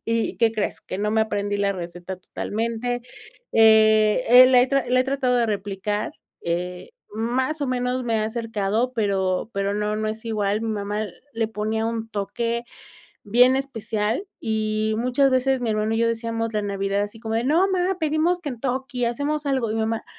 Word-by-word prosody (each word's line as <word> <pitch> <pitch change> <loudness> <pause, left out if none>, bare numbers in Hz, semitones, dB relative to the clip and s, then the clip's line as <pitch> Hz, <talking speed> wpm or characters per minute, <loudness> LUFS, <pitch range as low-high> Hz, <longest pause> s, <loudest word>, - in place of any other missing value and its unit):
Y 230 0 -1
¿qué 230 -1 +3
crees? 215 -2 -2
Que 185 - -6
no 210 +1 0
me 220 0 +3
aprendí 205 -1 -2
la 200 0 +1
receta 175 +1 -7
totalmente, 230 +5 -3 0.5
eh 220 +1 +5
eh, 250 +1 +9
la 255 -1 +6
he 250 - +4
tra 275 0 +1
la 255 0 +4
he 255 - +1
tratado 265 -2 +1
de 235 -1 +2
replicar, 205 0 -2 0.3
eh, 180 +1 -3 0.2
más 255 +7 -1
o - - 0
menos 250 0 -1
me 230 -1 0
he - - +1
acercado 225 +1 -1
pero 195 -3 0
pero 200 0 0
no 210 0 -1
no 215 0 -2
es 220 +1 -4
igual 210 -1 0
mi 225 - -3
mamá 210 0 -2 0.3
le 225 -1 -1
ponía 220 +1 -2
un 225 -1 -3
toque 235 +3 -2 0.6
bien 245 +5 +5
especial, 230 - -2
y 215 0 -1
muchas 255 +3 +2
veces 260 0 +2
mi 230 -2 -1
hermano 215 +1 0
y - - 0
yo 230 0 +3
decíamos 230 0 -2
la 210 - 0
Navidad 200 0 -1
así 210 +2 -6
como 225 -1 -3
de 235 - 0
"no, 310 +6 +3
mamá, 370 0 +1
pedimos 320 +3 +1
Kentucky, 255 -3 -3
hacemos 285 +5 -2
algo", 260 -5 0
y - - -1
mi 225 - 0
mamá 225 0 -2
225 Hz, 185 wpm, -23 LUFS, 210-250 Hz, 0.6 s, eh